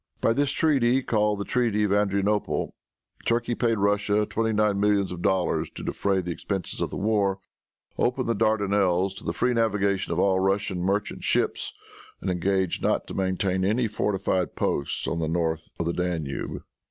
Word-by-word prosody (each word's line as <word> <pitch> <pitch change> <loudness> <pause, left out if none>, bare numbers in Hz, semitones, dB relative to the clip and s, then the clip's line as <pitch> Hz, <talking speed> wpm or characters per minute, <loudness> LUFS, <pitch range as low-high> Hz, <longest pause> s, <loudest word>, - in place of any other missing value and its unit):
By 115 - +3
this 140 +2 +1
treaty, 135 -4 +2
called 105 -3 +1
the 100 - -3
treaty 115 -4 +1
of 100 -1 +2
Adrianople, 105 0 0 0.5
Turkey 120 +1 +1
paid 115 -1 +1
Russia 100 +1 +2
twenty 110 +1 -1
nine 105 -2 +2
millions 100 -2 +2
of 90 -1 -6
dollars 95 -1 +1
to - - -7
defray 95 -1 0
the 90 -1 -4
expenses 95 +2 -4
of - - 0
the - - -5
war, 100 -2 +1 0.6
opened 125 +1 +1
the 115 - +2
Dardanelles 100 -4 +2
to - - -14
the - - -1
free 125 - +1
navigation 100 -5 +1
of 85 - -1
all 95 0 +3
Russian 95 0 0
merchant 100 +3 -1
ships, - - 0 0.5
and 95 - -2
engaged 95 0 0
not - - +1
to - - -5
maintain 95 0 0
any 110 +5 +2
fortified 95 -4 -1
posts 70 - -1
on 85 - -1
the 80 - -1
north 80 -1 -1
of 85 - -1
the 85 - 0
Danube. 85 -6 -3
100 Hz, 175 wpm, -26 LUFS, 95-110 Hz, 0.6 s, By